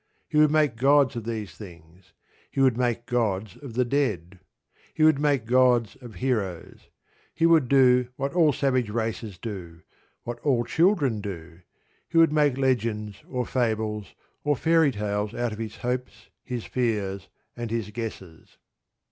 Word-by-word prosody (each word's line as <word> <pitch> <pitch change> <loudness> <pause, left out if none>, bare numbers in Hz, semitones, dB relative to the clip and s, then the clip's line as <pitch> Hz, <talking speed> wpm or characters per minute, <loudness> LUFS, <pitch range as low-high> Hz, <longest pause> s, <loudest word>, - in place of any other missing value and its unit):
He 150 - +1
would 155 0 +6
make 150 -6 +2
gods 140 +1 +4
of 115 -2 -5
these 110 -7 -4
things. 85 0 -14 0.4
He - - -5
would 130 -3 +4
make 120 -1 -1
gods 110 -5 -1
of 135 -6 -10
the 125 0 +2
dead. 100 - -1 0.6
He 155 - +1
would 155 -3 +5
make 145 -5 +1
gods 125 -2 +3
of 120 -5 -12
heroes. 100 -6 -3 0.5
He 165 - +2
would 165 -5 +5
do 125 -2 +5
what 140 +2 -3
all 165 -4 +4
savage 130 -4 0
races 110 -2 -3
do, 90 -5 -8 0.4
what 120 0 -6
all 125 -4 +1
children 155 - +2
do: 85 -4 -8 0.5
he - - -1
would 165 -2 +6
make 145 -4 +2
legends, 110 -6 -1
or 125 -2 -2
fables, 110 -4 -2 0.3
or 145 0 +2
fairy 160 0 +3
tales 105 -1 -3
out 120 -1 -1
of 105 - -9
his 110 -2 -5
hopes, 125 +1 -4
his 125 -3 -5
fears, 105 -6 -2 0.3
and 120 -1 -5
his 110 -2 -3
guesses. 100 -7 -8
120 Hz, 155 wpm, -25 LUFS, 105-135 Hz, 0.6 s, would